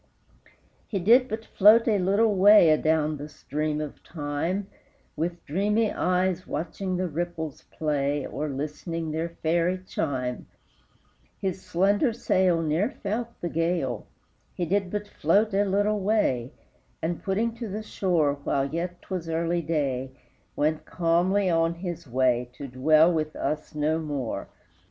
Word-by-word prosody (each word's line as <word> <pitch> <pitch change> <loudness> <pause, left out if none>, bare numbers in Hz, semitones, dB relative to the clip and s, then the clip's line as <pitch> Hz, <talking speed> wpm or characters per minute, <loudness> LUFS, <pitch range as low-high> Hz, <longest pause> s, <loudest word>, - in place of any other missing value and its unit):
He 205 - -2
did 235 +8 +5
but 220 0 -5
float 215 +4 +5
a 210 -3 +3
little 200 +4 +3
way 195 -3 +7
Adown 155 0 +2
the 145 +2 -7
stream 150 +1 -3
of 150 -2 -6
time, 165 +5 -3 0.5
With 170 +3 -3
dreamy 210 +7 +1
eyes 185 0 0
watching 185 +2 -3
the 185 0 -1
ripples 160 -2 -4
play, 145 -2 -1
Or 150 0 -4
listening 155 +3 -4
their 160 +2 -2
fairy 170 +2 0
chime; 125 -8 -3 0.9
His 190 -1 -3
slender 200 - +2
sail 185 -6 +2
Ne'er 160 +8 +1
felt 225 -2 -3
the 175 - -2
gale; 165 - -1 0.5
He 175 - -1
did 195 +2 0
but 210 +1 -3
float 205 +4 +2
a 200 +1 +3
little 205 +2 +1
way, 190 - +1 0.5
And, 165 +1 -3
putting 215 +4 0
to 230 -1 -5
the 210 +2 -5
shore 165 -9 0
While 140 +1 0
yet 175 +1 -4
'twas 180 -4 -5
early 170 +1 0
day, 135 -5 -2 0.4
Went 155 +1 0
calmly 180 +3 +1
on 165 -1 +2
his 175 -3 -6
way, 125 -1 +1
To 140 - -8
dwell 155 +6 +4
with 155 -1 -2
us 155 0 -3
no 155 +2 +1
more! 145 -6 -4
170 Hz, 140 wpm, -26 LUFS, 150-195 Hz, 0.9 s, way